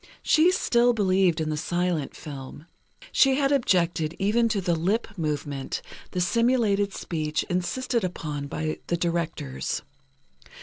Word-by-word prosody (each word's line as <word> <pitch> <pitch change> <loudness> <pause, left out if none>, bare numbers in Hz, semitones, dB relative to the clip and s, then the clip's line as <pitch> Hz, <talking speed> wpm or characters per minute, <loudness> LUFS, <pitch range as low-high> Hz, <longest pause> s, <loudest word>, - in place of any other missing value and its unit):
She 320 +3 +5
still 245 -9 +3
believed 190 -5 +2
in 155 -1 -1
the 155 - -2
silent 175 -2 -1
film. 145 0 -9 0.5
She 270 -1 +5
had 275 0 +2
objected 175 - +1
even 225 +4 +2
to 215 - 0
the 175 -2 0
lip 200 +7 -1
movement, 145 -5 -3 0.3
the 180 - -3
simulated 210 0 +2
speech 155 -5 -2
insisted 235 +7 -1
upon 150 -5 -4
by 155 +2 -3
the 170 - 0
directors. 165 - -2
180 Hz, 130 wpm, -26 LUFS, 155-225 Hz, 0.5 s, She